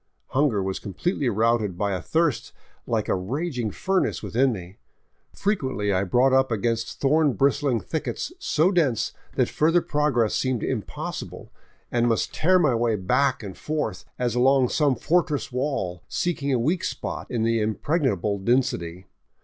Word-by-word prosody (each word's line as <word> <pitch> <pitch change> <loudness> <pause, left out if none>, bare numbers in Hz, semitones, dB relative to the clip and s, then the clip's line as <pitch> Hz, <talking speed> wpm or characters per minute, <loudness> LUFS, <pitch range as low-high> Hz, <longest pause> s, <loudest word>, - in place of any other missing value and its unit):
Hunger 130 -8 +1
was 95 0 -3
completely 130 - -2
routed 110 -3 +1
by 100 +1 0
a 95 - -2
thirst 160 -7 0 0.3
like - - 0
a - - +1
raging 125 - -2
furnace 190 - -1
within 130 +3 +2
me. 95 -3 -8 0.5
Frequently 130 - -1
I 95 +1 +1
brought 125 +7 +3
up 130 -1 +3
against 115 +1 -1
thorn 150 0 +3
bristling 140 -2 +2
thickets 160 - -4
so 170 - +2
dense 150 - +1 0.2
that - - +2
further 165 +3 +3
progress 145 -9 +1
seemed 130 -4 0
impossible, - - -5 0.4
and 120 0 +2
must 115 - 0
tear 185 +4 +3
my 155 -8 +3
way 115 -1 +1
back 115 +7 +1
and 95 -3 -7
forth, 150 -11 -3
as 120 -2 0
along 130 +1 +4
some 145 -4 +2
fortress 150 +3 0
wall, 125 -10 -2
seeking 155 -5 -1
a 130 - +3
weak 155 +10 0
spot - - -4
in 120 -3 -1
the 115 0 +2
impregnable 105 - 0
density. 115 -6 0
125 Hz, 150 wpm, -24 LUFS, 110-150 Hz, 0.5 s, along